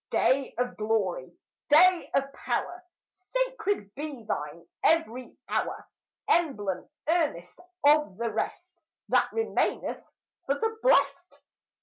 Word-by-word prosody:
Day 270 Hz, +1 st, +1 dB
of 245 Hz, 0 st, -2 dB
glory! 220 Hz, -, -1 dB, 0.4 s
day 350 Hz, +4 st, +6 dB
of 275 Hz, 0 st, 0 dB
power! 360 Hz, +5 st, -3 dB, 0.3 s
Sacred 410 Hz, -, -2 dB
be 285 Hz, -4 st, -6 dB
thine 150 Hz, -3 st, -4 dB, 0.2 s
ev'ry 255 Hz, -7 st, +1 dB
hour! -, -, -2 dB, 0.4 s
Emblem, 210 Hz, -, 0 dB, 0.2 s
earnest 305 Hz, -, 0 dB, 0.3 s
of 300 Hz, -9 st, +4 dB
the 230 Hz, 0 st, -2 dB
rest 360 Hz, +1 st, -4 dB, 0.4 s
That -, -, +3 dB
remaineth 450 Hz, 0 st, -1 dB, 0.4 s
for 280 Hz, -, +2 dB
the 445 Hz, +6 st, -1 dB
blest! 365 Hz, -7 st, +2 dB
295 Hz, 105 wpm, -28 LUFS, 225-360 Hz, 0.4 s, day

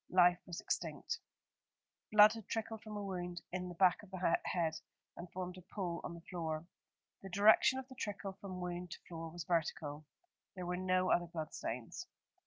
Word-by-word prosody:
Life 180 Hz, -1 st, +6 dB
was 175 Hz, -2 st, -4 dB
extinct. 460 Hz, -, -2 dB, 0.9 s
Blood 210 Hz, 0 st, +9 dB
had 225 Hz, -3 st, -8 dB
trickled 225 Hz, -1 st, -2 dB
from 215 Hz, -1 st, -6 dB
a 205 Hz, -, -3 dB
wound 175 Hz, -3 st, -4 dB
in 180 Hz, 0 st, -2 dB
the 175 Hz, -, -7 dB
back 180 Hz, 0 st, +5 dB
of 210 Hz, -, -14 dB
the 185 Hz, -3 st, +2 dB
head 165 Hz, -3 st, +1 dB, 0.4 s
and 170 Hz, 0 st, -8 dB
formed 180 Hz, 0 st, -4 dB
a 180 Hz, -, -19 dB
pool 175 Hz, -4 st, -1 dB
on 170 Hz, -, -4 dB
the 170 Hz, -, -10 dB
floor. 160 Hz, -2 st, -2 dB, 0.6 s
The 195 Hz, -, -7 dB
direction 210 Hz, +7 st, +6 dB
of 265 Hz, -1 st, -5 dB
the 260 Hz, -, -11 dB
trickle 205 Hz, -4 st, -4 dB
from 185 Hz, -2 st, -5 dB
wound 180 Hz, 0 st, -3 dB
to -, -, -7 dB
floor 165 Hz, -1 st, -5 dB
was 170 Hz, +1 st, -6 dB
vertical. 155 Hz, -3 st, -1 dB, 0.5 s
There 180 Hz, -1 st, -4 dB
were 180 Hz, +1 st, -1 dB
no 185 Hz, 0 st, +2 dB
other 175 Hz, 0 st, +3 dB
blood 160 Hz, -2 st, -5 dB
stains. 115 Hz, 0 st, -4 dB
180 Hz, 190 wpm, -36 LUFS, 170-195 Hz, 0.9 s, Blood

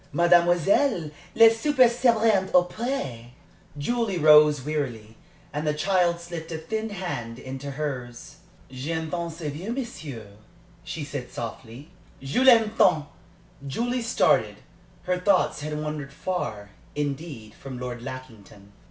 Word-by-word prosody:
"Mademoiselle, 175 Hz, -, +3 dB, 0.2 s
le 225 Hz, -, +9 dB
souper 255 Hz, +2 st, +4 dB
sera 235 Hz, -1 st, +2 dB
bientôt 190 Hz, -4 st, +3 dB
prêt." 135 Hz, -, -4 dB, 0.4 s
Julie 220 Hz, +5 st, -1 dB
rose 150 Hz, -3 st, +6 dB
wearily, 120 Hz, -8 st, -4 dB, 0.4 s
and 150 Hz, +1 st, -3 dB
the 150 Hz, -, +1 dB
child 175 Hz, 0 st, +1 dB
slipped 170 Hz, -1 st, -7 dB
a 160 Hz, -, -3 dB
thin 220 Hz, +8 st, -4 dB
hand 175 Hz, -, -5 dB
into 135 Hz, +2 st, -7 dB
hers. 135 Hz, -4 st, -6 dB, 0.3 s
"J'aime 160 Hz, +5 st, -4 dB
tant 170 Hz, -1 st, -3 dB
ce 165 Hz, +2 st, -12 dB
vieux 155 Hz, +8 st, -4 dB
monsieur," 160 Hz, -, -6 dB, 0.6 s
she 160 Hz, -, -5 dB
said, 140 Hz, -3 st, -6 dB
softly. 120 Hz, +5 st, -8 dB, 0.3 s
"Je 135 Hz, -, -1 dB
l'aime 230 Hz, -4 st, +6 dB
tant!" 155 Hz, -5 st, +4 dB, 0.6 s
Julie 240 Hz, -, -1 dB
started. 230 Hz, +1 st, +2 dB, 0.5 s
Her 180 Hz, -1 st, -1 dB
thoughts 185 Hz, -4 st, +2 dB
had 150 Hz, 0 st, -4 dB
wandered 150 Hz, -2 st, -5 dB
far, 125 Hz, -, -4 dB, 0.2 s
indeed, 140 Hz, -6 st, -4 dB
from 130 Hz, 0 st, -9 dB
Lord 125 Hz, -1 st, -6 dB
Lackington. 110 Hz, -6 st, -10 dB
155 Hz, 125 wpm, -25 LUFS, 135-190 Hz, 0.6 s, le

